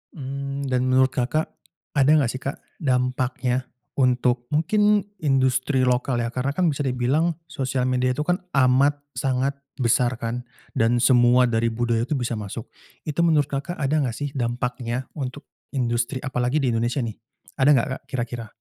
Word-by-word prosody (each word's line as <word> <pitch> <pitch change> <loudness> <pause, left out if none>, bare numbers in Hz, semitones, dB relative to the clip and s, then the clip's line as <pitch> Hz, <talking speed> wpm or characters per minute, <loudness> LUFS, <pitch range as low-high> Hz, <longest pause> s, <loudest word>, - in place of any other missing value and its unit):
Mmm, 140 -1 -4
dan 125 0 +1
menurut 130 0 +4
Kakak 130 +6 -1 0.4
ada 140 -2 +3
nggak 135 -6 +2
sih, 130 - -6
Kak, 140 +1 -5 0.2
dampaknya 125 -2 0 0.3
untuk 125 -2 +2
mungkin 205 +6 +3 0.2
industri 130 -2 +2
lokal, 125 0 +1
ya. 115 - -1
Karena 130 +3 -1
kan 180 +1 +2
bisa 145 -1 -2
dibilang 135 +7 +1 0.2
sosial 130 -4 -2
media 125 0 +1
itu 150 - -2
kan 175 +3 +1 0.2
amat 135 +2 +4 0.2
sangat 135 +1 0 0.2
besar, 120 +1 +3
kan, 120 +2 -3 0.3
dan 120 +1 +3
semua 125 0 +5
dari 115 0 +1
budaya 115 0 0
itu 140 - -2
bisa 120 -3 -2
masuk. 100 -2 -6 0.3
Itu 150 +1 -4
menurut 150 -4 +3
Kakak 140 +6 -3
ada 145 -2 0
nggak 125 -5 -1
sih 145 +3 -3
dampaknya 125 +1 -2
untuk 140 +1 -5 0.3
industri, 120 0 -1
apalagi 130 +2 0
di 130 - +2
Indonesia, 120 +4 0
nih? 110 -2 -5 0.4
Ada 135 +2 +4
nggak, 120 - +2
Kak, - - -29
kira-kira? 120 -3 -4
130 Hz, 160 wpm, -24 LUFS, 120-140 Hz, 0.4 s, semua